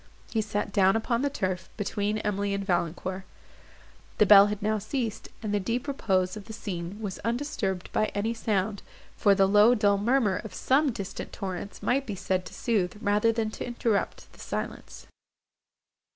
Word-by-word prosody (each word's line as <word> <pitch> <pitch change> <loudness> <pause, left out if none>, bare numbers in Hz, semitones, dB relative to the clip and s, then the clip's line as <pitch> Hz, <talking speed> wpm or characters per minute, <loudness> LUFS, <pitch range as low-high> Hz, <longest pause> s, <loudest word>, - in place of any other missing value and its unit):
He 220 - +1
sat 205 -1 -3
down 195 0 +4
upon 235 +2 0
the 285 - +1
turf, 185 -8 -3
between 205 0 -1
Emily 205 -1 -1
and 200 0 -3
Valancourt. 180 +1 -1 1.0
The 210 - +5
bell 200 0 +9
had 210 -1 -3
now 215 +1 0
ceased, 225 +1 -3
and 210 -1 -2
the 205 - +2
deep 230 +8 -2
repose 190 -9 0
of 210 -2 -8
the 220 - -9
scene 190 -2 -5
was 205 -4 -5
undisturbed 230 -7 -2
by 215 - +3
any 215 +3 0
sound, 210 -2 -1 0.3
for 200 -2 +4
the 195 -1 +4
low 210 +4 +6
dull 205 -3 +3
murmur 225 -3 +2
of 210 -4 -8
some 275 +2 +2
distant 200 -5 -6
torrents 190 +1 -6
might 270 +2 +1
be 210 - -3
said 185 0 -1
to - - -12
sooth, 210 -7 0
rather 210 +2 +2
than 225 -1 -1
to - - -6
interrupt, 235 -3 -2
the - - -18
silence. - - -6
205 Hz, 175 wpm, -27 LUFS, 195-225 Hz, 1.0 s, bell